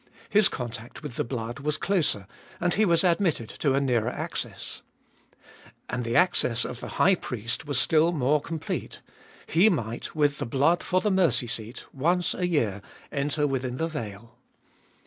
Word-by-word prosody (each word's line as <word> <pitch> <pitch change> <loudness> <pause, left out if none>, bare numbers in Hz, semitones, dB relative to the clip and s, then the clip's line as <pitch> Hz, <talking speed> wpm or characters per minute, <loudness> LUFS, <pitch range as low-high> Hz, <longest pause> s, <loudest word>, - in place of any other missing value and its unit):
His 210 -1 +5
contact 120 +2 -7
with 145 -6 -6
the - - 0
blood 120 0 -5
was 150 +2 -1
closer, 160 - +1 0.3
and 175 0 +1
he 215 - +3
was 170 -2 +3
admitted 170 - +1
to 140 -3 0
a - - +3
nearer 125 -4 +1
access. - - -5 1.1
And 125 -1 -2
the 115 0 -2
access 125 -9 +3
of 120 - -5
the - - -6
high 195 - +5
priest 120 - -3
was 145 -3 +1
still 160 +1 +4
more 150 -1 +2
complete; 160 +1 -5 0.4
he 180 +7 +5
might, 115 - -3
with 145 -1 +2
the - - -2
blood 145 +8 +2
for 185 0 +1
the 210 - +1
mercy 185 -8 +3
seat, 115 0 -6
once 170 +6 +1
a 180 - -1
year 110 - 0 0.3
enter 145 +1 0
within 130 -3 -2
the 160 - 0
veil. 115 -5 -7
140 Hz, 165 wpm, -27 LUFS, 120-170 Hz, 1.1 s, His